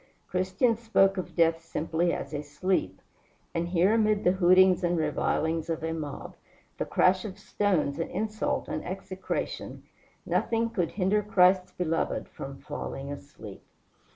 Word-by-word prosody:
Christians 190 +6 +1
spoke 195 -4 +3
of 185 - -5
death 165 -1 +3
simply 165 +1 -1
as 140 - -4
a 145 - -2
sleep. 180 +6 -2 0.5
And 170 0 -1
here 180 +4 +3
amid 215 -2 +2
the 180 - +5
hootings 185 0 +5
and 175 0 +1
revilings 160 +1 0
of 160 -1 -2
a 160 0 -1
mob, 150 -3 -6 0.5
the - - 0
crash 185 0 +3
of 195 -3 -7
stones 175 -8 0
and 165 - -2
insult 215 0 -2
and - - -3
execration, 190 +1 -5 0.4
nothing 230 0 0
could 175 -6 -1
hinder 205 +2 +2
Christ's 185 -3 +3
beloved 165 -2 -1
from 135 0 -8
falling 140 -1 -6
asleep. 140 -8 -10
180 Hz, 145 wpm, -28 LUFS, 160-195 Hz, 0.5 s, the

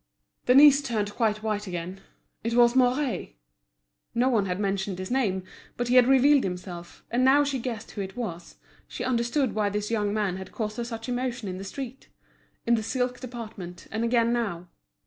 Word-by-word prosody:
Denise 280 +2 +8
turned 215 -6 -2
quite 215 -2 0
white 210 -1 -2
again. 180 +2 -5 0.4
It 230 +1 -1
was 240 0 +5
Mouret; 255 +1 +1 0.8
no 245 +2 +3
one 215 -6 +2
had 180 +1 -2
mentioned 195 -1 -1
his 185 +3 -6
name, 205 -8 +1 0.3
but 245 0 -2
he 250 - +3
had 250 -1 +7
revealed 270 +1 +5
himself, 180 -1 -6
and 245 +2 +2
now 275 +3 +6
she 280 -2 -1
guessed 230 -2 -5
who 205 - -5
it 190 +1 -6
was, 175 -8 -5 0.3
she - - -6
understood 245 +1 0
why 210 -1 +1
this 210 +2 -3
young 210 -3 +1
man 205 -3 -1
had 190 - -8
caused 215 -2 -4
her 240 - -1
such 230 0 -6
emotion 245 -2 -2
in 185 0 -5
the - - -6
street, 265 +5 -7 0.6
in 235 - +3
the 225 - +2
silk 250 +2 -2
department, 220 -8 -8
and 220 +1 -1
again 235 0 +2
now. 185 -8 -2
230 Hz, 185 wpm, -26 LUFS, 200-250 Hz, 0.8 s, Denise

